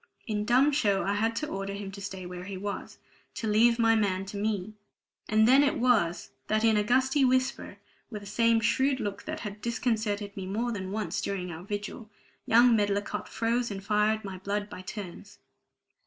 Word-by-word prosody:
In 210 Hz, -2 st, -2 dB
dumb 255 Hz, +6 st, +4 dB
show 205 Hz, -9 st, +2 dB
I 200 Hz, -, 0 dB
had 225 Hz, +3 st, 0 dB
to 305 Hz, -, -2 dB
order 195 Hz, -2 st, -4 dB
him 200 Hz, -1 st, -6 dB
to 200 Hz, 0 st, -9 dB
stay 190 Hz, -2 st, -6 dB
where 180 Hz, 0 st, -7 dB
he 195 Hz, 0 st, -6 dB
was, 200 Hz, +1 st, -5 dB, 0.4 s
to 225 Hz, -, -3 dB
leave 230 Hz, +2 st, +4 dB
my 225 Hz, -1 st, +4 dB
man 195 Hz, -3 st, 0 dB
to 200 Hz, -, -8 dB
me. 210 Hz, -1 st, -2 dB, 0.6 s
And 220 Hz, +1 st, +4 dB
then 265 Hz, +3 st, +7 dB
it 290 Hz, +2 st, +2 dB
was 225 Hz, -9 st, +1 dB, 0.2 s
that 215 Hz, +1 st, +1 dB
in 225 Hz, -1 st, +4 dB
a 210 Hz, -, +3 dB
gusty 260 Hz, +5 st, +2 dB
whisper, 255 Hz, 0 st, 0 dB, 0.3 s
with 210 Hz, -3 st, -7 dB
the -, -, -10 dB
same 230 Hz, +2 st, +3 dB
shrewd 265 Hz, +4 st, +2 dB
look 205 Hz, -4 st, -4 dB
that -, -, -5 dB
had 210 Hz, -1 st, -7 dB
disconcerted 220 Hz, -3 st, -1 dB
me 190 Hz, -1 st, -5 dB
more 230 Hz, +5 st, -1 dB
than 190 Hz, -4 st, -4 dB
once 215 Hz, +1 st, -2 dB
during 180 Hz, -3 st, -3 dB
our 160 Hz, 0 st, -7 dB
vigil, 205 Hz, +3 st, -6 dB, 0.4 s
young 235 Hz, +1 st, +6 dB
Medlicott 205 Hz, -1 st, -1 dB
froze 235 Hz, +2 st, 0 dB
and 195 Hz, -1 st, -6 dB
fired 210 Hz, +1 st, +1 dB
my 190 Hz, -2 st, -6 dB
blood 205 Hz, +2 st, -3 dB
by 185 Hz, -, -7 dB
turns. 200 Hz, +1 st, -8 dB
210 Hz, 195 wpm, -28 LUFS, 200-230 Hz, 0.6 s, then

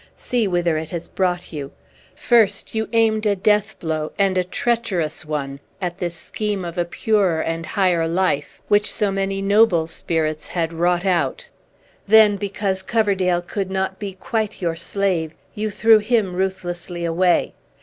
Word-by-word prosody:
See 240 Hz, -4 st, 0 dB
whither 175 Hz, -3 st, +1 dB
it 160 Hz, 0 st, -4 dB
has 170 Hz, -2 st, -5 dB
brought 180 Hz, -2 st, -2 dB
you! 140 Hz, -3 st, -5 dB, 0.4 s
First, 220 Hz, -5 st, +2 dB
you 220 Hz, 0 st, -2 dB
aimed 220 Hz, -2 st, +2 dB
a 205 Hz, -, +2 dB
death 210 Hz, +2 st, +1 dB
blow, 155 Hz, -2 st, -3 dB
and 195 Hz, -2 st, +2 dB
a 185 Hz, -, +2 dB
treacherous 185 Hz, -6 st, -1 dB
one, 140 Hz, -3 st, -4 dB, 0.2 s
at 180 Hz, -1 st, -4 dB
this 175 Hz, -2 st, -3 dB
scheme 205 Hz, +2 st, -3 dB
of 170 Hz, -1 st, -6 dB
a 175 Hz, -1 st, 0 dB
purer 190 Hz, -2 st, +1 dB
and 165 Hz, 0 st, -3 dB
higher 180 Hz, -5 st, +1 dB
life, 170 Hz, -4 st, -1 dB
which 205 Hz, 0 st, +3 dB
so 205 Hz, -2 st, 0 dB
many 195 Hz, 0 st, -2 dB
noble 200 Hz, -5 st, +4 dB
spirits 160 Hz, -1 st, -2 dB
had 165 Hz, -2 st, -2 dB
wrought 175 Hz, +2 st, +1 dB
out. 180 Hz, -3 st, 0 dB, 0.6 s
Then, 215 Hz, 0 st, +7 dB
because 195 Hz, -1 st, -2 dB
Coverdale 190 Hz, -4 st, +1 dB
could 195 Hz, +1 st, -3 dB
not 190 Hz, 0 st, -2 dB
be 200 Hz, -2 st, -5 dB
quite 215 Hz, +3 st, -3 dB
your 170 Hz, -4 st, -1 dB
slave, 170 Hz, -2 st, -1 dB, 0.2 s
you 215 Hz, +1 st, -2 dB
threw 220 Hz, +1 st, +5 dB
him 215 Hz, -3 st, +1 dB
ruthlessly 180 Hz, -2 st, -3 dB
away. 175 Hz, +1 st, +2 dB
185 Hz, 160 wpm, -21 LUFS, 170-205 Hz, 0.6 s, Then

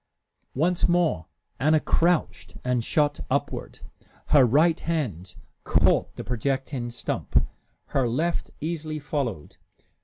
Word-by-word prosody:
Once 170 Hz, +6 st, +2 dB
more 170 Hz, -, +1 dB, 0.3 s
Anna 155 Hz, +2 st, +4 dB
crouched 170 Hz, +2 st, 0 dB
and 125 Hz, -2 st, 0 dB
shot 145 Hz, +3 st, +1 dB
upward. -, -, -2 dB, 0.5 s
Her 145 Hz, -3 st, +7 dB
right 155 Hz, +7 st, +4 dB
hand 120 Hz, -, -3 dB, 0.3 s
caught -, -, +2 dB
the -, -, -6 dB
projecting 130 Hz, +1 st, -2 dB
stump, 120 Hz, -, -1 dB, 0.4 s
her 130 Hz, -3 st, +1 dB
left 165 Hz, +8 st, -1 dB
easily 155 Hz, -1 st, -3 dB
followed. 135 Hz, -, -4 dB
145 Hz, 110 wpm, -25 LUFS, 125-160 Hz, 0.5 s, Her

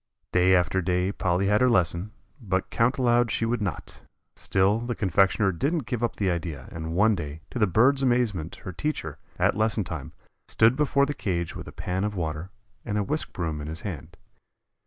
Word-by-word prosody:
Day 90 Hz, +1 st, +4 dB
after 90 Hz, +1 st, +2 dB
day 90 Hz, +1 st, 0 dB
Polly 90 Hz, -1 st, 0 dB
had 105 Hz, +3 st, +3 dB
her 125 Hz, -, +5 dB
lesson, 90 Hz, -2 st, +1 dB, 0.3 s
but 95 Hz, -4 st, -2 dB
count 115 Hz, +3 st, +2 dB
aloud 120 Hz, -2 st, +3 dB
she 115 Hz, -, 0 dB
would 115 Hz, 0 st, -1 dB
not. 100 Hz, -4 st, -5 dB, 0.3 s
Still 95 Hz, +3 st, +2 dB
the 120 Hz, 0 st, -3 dB
confectioner 95 Hz, 0 st, +2 dB
didn't 140 Hz, -, -1 dB
give 125 Hz, -1 st, -3 dB
up 120 Hz, -, 0 dB
the 95 Hz, -3 st, 0 dB
idea, 85 Hz, -3 st, -4 dB
and 80 Hz, 0 st, -5 dB
one 110 Hz, +4 st, +4 dB
day, 80 Hz, -4 st, -5 dB
to 125 Hz, -, -4 dB
the 105 Hz, -, +4 dB
bird's 130 Hz, +9 st, +4 dB
amazement 120 Hz, -, 0 dB
her 95 Hz, -, -4 dB
teacher, 85 Hz, -, -4 dB, 0.2 s
at -, -, +3 dB
lesson 110 Hz, 0 st, +1 dB
time, 85 Hz, -, -7 dB, 0.3 s
stood 115 Hz, +3 st, +4 dB
before 140 Hz, -1 st, +2 dB
the 145 Hz, -, -3 dB
cage 85 Hz, -, -3 dB
with -, -, -7 dB
a -, -, -8 dB
pan 95 Hz, +2 st, -3 dB
of 105 Hz, 0 st, -2 dB
water 80 Hz, 0 st, -3 dB, 0.3 s
and 105 Hz, -2 st, -2 dB
a 105 Hz, -, +1 dB
whisk 150 Hz, +9 st, -2 dB
broom 80 Hz, -4 st, -3 dB
in 75 Hz, -, -6 dB
his 80 Hz, +1 st, -6 dB
hand. 85 Hz, -2 st, -7 dB
95 Hz, 200 wpm, -26 LUFS, 85-115 Hz, 0.3 s, her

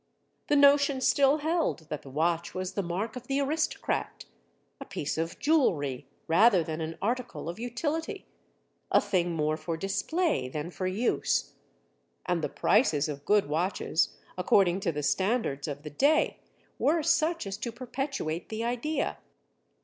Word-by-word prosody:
The 295 Hz, -, +3 dB
notion 280 Hz, -1 st, +5 dB
still 275 Hz, +2 st, +4 dB
held 310 Hz, -, -1 dB
that 150 Hz, -, -4 dB
the 135 Hz, -, -12 dB
watch 165 Hz, +4 st, 0 dB
was 185 Hz, 0 st, -3 dB
the 200 Hz, -, -1 dB
mark 195 Hz, +6 st, -3 dB
of 250 Hz, -1 st, -8 dB
the 275 Hz, 0 st, 0 dB
aristocrat—a 290 Hz, -1 st, -4 dB
piece 180 Hz, -, -3 dB
of 165 Hz, +1 st, -3 dB
jewelry 150 Hz, -, +1 dB, 0.2 s
rather 185 Hz, +2 st, +5 dB
than 160 Hz, 0 st, -4 dB
an 160 Hz, +1 st, -4 dB
article 245 Hz, -5 st, -2 dB
of 170 Hz, +5 st, -5 dB
utility, 295 Hz, +7 st, -3 dB, 0.7 s
a -, -, +6 dB
thing 175 Hz, -2 st, 0 dB
more 155 Hz, 0 st, 0 dB
for 165 Hz, +1 st, -4 dB
display 200 Hz, -, 0 dB
than 150 Hz, +5 st, -5 dB
for 185 Hz, +1 st, -3 dB
use. 205 Hz, +7 st, 0 dB, 0.7 s
And 170 Hz, -3 st, 0 dB
the -, -, 0 dB
prices 160 Hz, -, +2 dB
of 145 Hz, -1 st, -6 dB
good 210 Hz, -4 st, +3 dB
watches, 165 Hz, +2 st, 0 dB, 0.2 s
according 180 Hz, 0 st, +3 dB
to 185 Hz, -3 st, 0 dB
the 150 Hz, -1 st, -4 dB
standards 190 Hz, -, 0 dB
of 145 Hz, -1 st, -5 dB
the 150 Hz, -, -7 dB
day, 290 Hz, -, +2 dB, 0.4 s
were 320 Hz, +1 st, +2 dB
such 330 Hz, 0 st, +2 dB
as 195 Hz, 0 st, -4 dB
to 235 Hz, -, -4 dB
perpetuate 245 Hz, -, -4 dB
the 220 Hz, +1 st, -3 dB
idea. 245 Hz, +6 st, -1 dB
195 Hz, 150 wpm, -29 LUFS, 160-275 Hz, 0.7 s, a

